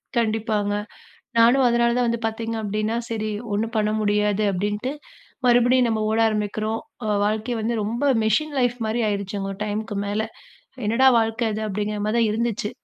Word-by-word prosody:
கண்டிப்பாங்க, 220 Hz, -2 st, 0 dB, 0.7 s
நானும் 240 Hz, +4 st, +5 dB
அதனால 235 Hz, 0 st, +2 dB
தான் 250 Hz, -1 st, +2 dB
வந்து 235 Hz, 0 st, -1 dB
பாத்தீங்க 225 Hz, +1 st, -3 dB
அப்டின்னா, 215 Hz, +2 st, -1 dB
“சரி 215 Hz, -1 st, -2 dB, 0.2 s
ஒண்ணும் 220 Hz, +3 st, -1 dB
பண்ண 215 Hz, -1 st, +2 dB
முடியாது” 210 Hz, 0 st, +1 dB
அப்டின்ட்டு 205 Hz, +7 st, -2 dB, 0.5 s
மறுபடியும் 245 Hz, +1 st, +4 dB
நம்ப 220 Hz, -1 st, 0 dB
ஓட 220 Hz, -, +1 dB
ஆரம்பிக்கிறோம், 215 Hz, +1 st, -2 dB, 0.3 s
ஒ -, -, -2 dB, 0.2 s
வாழ்க்கை 215 Hz, +3 st, -1 dB
வந்து 230 Hz, +2 st, -1 dB
ரொம்ப 230 Hz, +6 st, -2 dB, 0.2 s
மெஷின் 290 Hz, +8 st, +1 dB
லைஃப் 245 Hz, -1 st, +2 dB
மாரி 220 Hz, +2 st, -1 dB
ஆயிடுச்சுங்க, 200 Hz, -1 st, -3 dB
ஒரு 195 Hz, -, -11 dB
டைமுக்கு 210 Hz, 0 st, -3 dB
மேல 205 Hz, +2 st, -1 dB, 0.6 s
“என்னடா 230 Hz, +5 st, +4 dB
வாழ்க்க 225 Hz, 0 st, 0 dB
இது?” 215 Hz, -, -3 dB
அப்படிங்கிற 210 Hz, +1 st, -2 dB
மாரி 215 Hz, +2 st, 0 dB
தான் 230 Hz, -2 st, +3 dB
இருந்துச்சு. 225 Hz, -1 st, -1 dB
220 Hz, 160 wpm, -23 LUFS, 210-235 Hz, 0.7 s, நானும்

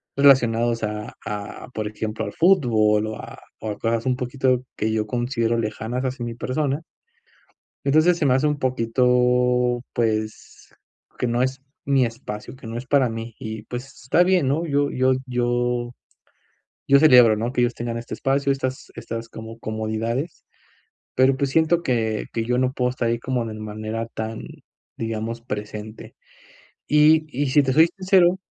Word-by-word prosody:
relacionados 120 Hz, -4 st, +4 dB
a 105 Hz, 0 st, -4 dB
a, 105 Hz, -1 st, -6 dB
por 110 Hz, -, -3 dB
ejemplo, 110 Hz, +1 st, -4 dB
al -, -, -4 dB
fútbol 110 Hz, -, +3 dB
o 110 Hz, -, -4 dB
a -, -, -10 dB, 0.2 s
o 110 Hz, -1 st, -4 dB
a 100 Hz, -, -6 dB
cosas 115 Hz, +1 st, -1 dB
un 130 Hz, -1 st, +2 dB
poquito 130 Hz, 0 st, 0 dB
que 110 Hz, -, 0 dB
yo 110 Hz, -1 st, 0 dB
considero 120 Hz, 0 st, -1 dB
lejanas 115 Hz, +3 st, -3 dB
hacia 125 Hz, -2 st, -3 dB
mi 120 Hz, -, -4 dB
persona. 140 Hz, +4 st, -1 dB, 1.1 s
Entonces 155 Hz, +5 st, +4 dB
se 155 Hz, -, 0 dB
me 130 Hz, -, +4 dB
hace 135 Hz, +3 st, +2 dB
un 150 Hz, -1 st, 0 dB
poquito, 125 Hz, 0 st, +2 dB
pues, 110 Hz, -2 st, -3 dB, 0.5 s
que 125 Hz, -, 0 dB
no 120 Hz, +1 st, 0 dB
es 130 Hz, 0 st, -2 dB, 0.2 s
mi 135 Hz, -3 st, +3 dB
espacio, 115 Hz, 0 st, -7 dB
que 130 Hz, -, -14 dB
no 115 Hz, +1 st, -5 dB
es 125 Hz, -, -6 dB
para 130 Hz, -2 st, +3 dB
mí 115 Hz, 0 st, -6 dB
y, 110 Hz, 0 st, -6 dB
pues, 125 Hz, +3 st, -6 dB, 0.2 s
está 165 Hz, +8 st, +4 dB
bien, 180 Hz, -6 st, +2 dB
¿no? 155 Hz, +5 st, 0 dB
Yo 145 Hz, -1 st, +1 dB
yo 130 Hz, +1 st, +2 dB
yo 120 Hz, -1 st, -1 dB, 1.0 s
yo 140 Hz, 0 st, +6 dB
celebro 125 Hz, -7 st, +7 dB
¿no? 115 Hz, +3 st, -2 dB
Que 125 Hz, -2 st, 0 dB
ellos 120 Hz, 0 st, +2 dB
tengan 115 Hz, 0 st, -4 dB
este 115 Hz, 0 st, -7 dB
espacio, 140 Hz, +1 st, +1 dB
estas 130 Hz, -1 st, -3 dB
estas 115 Hz, 0 st, -6 dB
como 115 Hz, 0 st, -9 dB
comodidades, 110 Hz, +6 st, -3 dB, 0.7 s
pero, 130 Hz, +1 st, +4 dB
pues, 140 Hz, 0 st, 0 dB
siento 165 Hz, +3 st, +2 dB
que 115 Hz, -6 st, -1 dB
que 115 Hz, -, -1 dB
yo 125 Hz, +2 st, 0 dB
no 130 Hz, 0 st, +1 dB
puedo 125 Hz, 0 st, +1 dB
estar 125 Hz, -2 st, -2 dB
ahí 115 Hz, 0 st, 0 dB
como 125 Hz, -2 st, -2 dB
de 110 Hz, -, -6 dB
manera 110 Hz, +1 st, -5 dB
tan, 110 Hz, -1 st, -5 dB, 0.6 s
digamos, 115 Hz, +1 st, -3 dB
presente. 105 Hz, -1 st, -7 dB, 0.7 s
Y 155 Hz, +1 st, +5 dB
y 145 Hz, +2 st, -1 dB
si 145 Hz, +2 st, +4 dB
te 130 Hz, -1 st, 0 dB
soy 160 Hz, +3 st, +6 dB
sincero 185 Hz, -1 st, +4 dB
120 Hz, 170 wpm, -23 LUFS, 115-135 Hz, 1.1 s, celebro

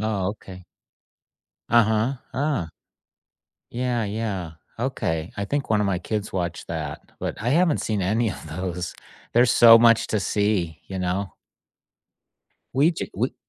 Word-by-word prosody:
Oh, 105 Hz, -4 st, -1 dB
okay. 95 Hz, -3 st, -9 dB, 1.0 s
Uh-huh, 110 Hz, +2 st, +3 dB, 0.2 s
ah. 135 Hz, -, -1 dB, 1.0 s
Yeah, 120 Hz, -2 st, -1 dB
yeah, 100 Hz, -5 st, -3 dB, 0.3 s
okay, 85 Hz, -10 st, -2 dB
I 100 Hz, -, -1 dB
think 140 Hz, -4 st, -2 dB
one 105 Hz, -, +3 dB
of 105 Hz, -, +1 dB
my 95 Hz, -3 st, 0 dB
kids 105 Hz, +2 st, -3 dB
watched 90 Hz, -2 st, -3 dB
that, -, -, -4 dB, 0.2 s
but -, -, -4 dB
I 120 Hz, -, -1 dB
haven't 165 Hz, +1 st, +3 dB
seen 105 Hz, -3 st, -1 dB
any 110 Hz, +4 st, +1 dB
of 85 Hz, -, -9 dB
those. 90 Hz, +2 st, -4 dB, 0.4 s
There's 120 Hz, +1 st, +5 dB
so 115 Hz, -1 st, +8 dB
much 115 Hz, -1 st, +5 dB
to 110 Hz, -, 0 dB
see, 100 Hz, -6 st, 0 dB
you 95 Hz, -1 st, -4 dB
know? 90 Hz, +1 st, -2 dB, 1.4 s
We 145 Hz, +6 st, +4 dB
ju -, -, -4 dB
we -, -, -1 dB
105 Hz, 140 wpm, -24 LUFS, 95-120 Hz, 1.4 s, so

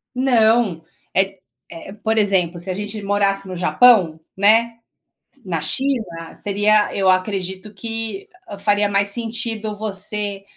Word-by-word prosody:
Não 230 Hz, -8 st, +2 dB, 0.3 s
é 190 Hz, -, +4 dB
q 195 Hz, 0 st, -16 dB, 0.3 s
eh, 170 Hz, +3 st, -10 dB
por 220 Hz, 0 st, 0 dB
exemplo, 190 Hz, -5 st, +1 dB
se 175 Hz, +3 st, -6 dB
a -, -, 0 dB
gente 205 Hz, +2 st, -5 dB
morasse 200 Hz, 0 st, +1 dB
no 185 Hz, -, -6 dB
Japão, 180 Hz, -3 st, +4 dB, 0.2 s
né, 225 Hz, +3 st, +3 dB, 0.7 s
na 170 Hz, -4 st, -2 dB
China, 180 Hz, -, -2 dB
seria 205 Hz, +1 st, +2 dB
eu 190 Hz, -1 st, +2 dB
acredito 190 Hz, +1 st, -1 dB
que 225 Hz, -1 st, -5 dB, 0.3 s
faria 205 Hz, 0 st, +2 dB
mais 200 Hz, 0 st, +1 dB
sentido 225 Hz, -1 st, -3 dB
você 205 Hz, -1 st, -4 dB
205 Hz, 130 wpm, -20 LUFS, 190-220 Hz, 0.7 s, é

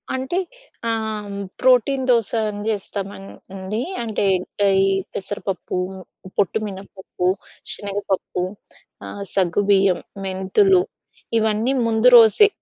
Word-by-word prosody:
అంటే 260 Hz, +7 st, -2 dB, 0.5 s
ఆహ్, 220 Hz, -2 st, -2 dB
హ్మ్. 200 Hz, 0 st, -5 dB, 0.2 s
ప్రోటీన్ 260 Hz, +1 st, +3 dB
దోస 230 Hz, -4 st, +3 dB, 0.2 s
అని 205 Hz, 0 st, -6 dB
జేస్తామన్ 200 Hz, -2 st, -4 dB, 0.3 s
అండి. 195 Hz, +4 st, -3 dB, 0.2 s
అంటే, 220 Hz, -3 st, -1 dB, 0.6 s
ఈ -, -, +4 dB, 0.3 s
పెసరపప్పు, 195 Hz, -1 st, -4 dB, 0.6 s
పొట్టు 205 Hz, +2 st, +2 dB
మినపప్పు, 190 Hz, -2 st, -5 dB, 0.5 s
శనగపప్పు, 200 Hz, -3 st, -3 dB, 0.6 s
ఆహ్, 200 Hz, -, -7 dB
సగ్గు 190 Hz, 0 st, +2 dB
బియ్యం, 195 Hz, -2 st, +4 dB, 0.3 s
మెంతులు 195 Hz, -, +3 dB, 0.6 s
ఇవన్నీ 220 Hz, +4 st, +1 dB
ముందు 225 Hz, +1 st, +3 dB
రోజే 230 Hz, -, +7 dB
205 Hz, 100 wpm, -21 LUFS, 195-230 Hz, 0.6 s, రోజే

